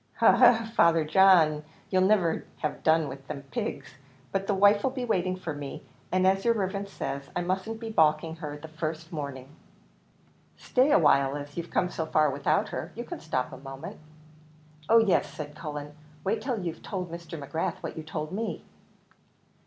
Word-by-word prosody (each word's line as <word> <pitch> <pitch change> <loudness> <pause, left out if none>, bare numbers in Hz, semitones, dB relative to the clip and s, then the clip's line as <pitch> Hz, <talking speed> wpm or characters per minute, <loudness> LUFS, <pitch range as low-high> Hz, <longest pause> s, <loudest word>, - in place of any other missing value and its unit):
"He, - - +2
he, 240 -2 +6
Father 170 -6 +4
John, 160 -3 +5 0.3
you'll 185 -1 +3
niver 185 -4 +2 0.2
have 150 - -2
done 160 -1 +3
with 135 0 -9
them 140 -2 -6
pigs! 135 +1 -5 0.3
But 195 +3 -1
the 205 - +1
wife'll 205 +5 +5
be 255 -1 -4
waiting 185 -5 0
for 175 -4 -5
me, 145 -1 -7 0.3
and, 185 0 +2
as 195 +1 +3
yer 235 - +4
riverence 200 -1 -3
says, 140 0 -5
I 175 - 0
mustn't 190 +5 -2
be 225 -1 -5
baulking 160 -2 +2
her 150 -3 -6
the 155 +2 -10
first 160 +1 -5
morning." 140 -3 -6 1.0
"Stay 260 +3 +2
a 300 - +7
while, 140 - +3
as 145 0 -8
you've 170 0 -5
come 180 - +1
so 160 - -3
far 155 -2 +3
without 150 +9 +1
her, - - -5
you 235 - -4
can - - -7
stop 130 -5 -2
a - - -7
moment." 135 +3 -9 0.9
"Oh 230 - +7
yes," 220 -5 +3
said 150 -1 -7
Cullen, 150 -2 -6 0.3
"wait 200 +4 0
till 250 -4 -2
you've 170 -3 -5
told 180 -4 -5
Mr. 170 0 -7
McGrath 145 +3 -2
what - - -5
you 160 - -5
told 155 0 -5
me." 220 +4 -3
165 Hz, 185 wpm, -28 LUFS, 150-195 Hz, 1.0 s, a